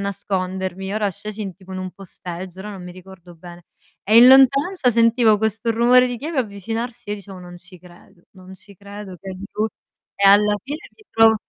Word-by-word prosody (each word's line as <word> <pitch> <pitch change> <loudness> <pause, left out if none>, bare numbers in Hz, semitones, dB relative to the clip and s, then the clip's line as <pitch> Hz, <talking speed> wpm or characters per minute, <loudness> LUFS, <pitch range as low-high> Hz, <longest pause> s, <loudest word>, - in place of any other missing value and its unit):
nascondermi. 190 -1 -4
Ora 210 -2 0
scesi 215 +3 -7
in 190 -3 -6
tipo 190 0 -14
in 185 - -5
un 185 -1 -6
posteggio, 185 -1 -9
ora 210 +2 -7
non 190 -3 -9
mi 180 - -9
ricordo 180 -1 -15
bene, 175 0 -13 0.4
e 215 +3 +3
in 240 +2 +9
lontananza 270 +3 +5
sentivo 230 -2 +3
questo 220 +1 -1
rumore 245 +2 +4
di 245 - -4
chiave 310 +1 -4
avvicinarsi 225 +1 -6
e - - -1
dicevo: 195 -2 -11
"Non 175 0 -11
ci 180 0 -15
credo, 175 0 -19
non 185 0 -14
ci 200 +2 -17
credo 200 -1 -10
che 195 - -8
è - - -7 0.2
lui. 215 +1 -1 0.5
"E 200 - +3
alla 205 +1 +5
fine 290 +3 -5 0.2
mi 430 - -21
trovò 225 0 +5
200 Hz, 200 wpm, -21 LUFS, 185-225 Hz, 0.5 s, in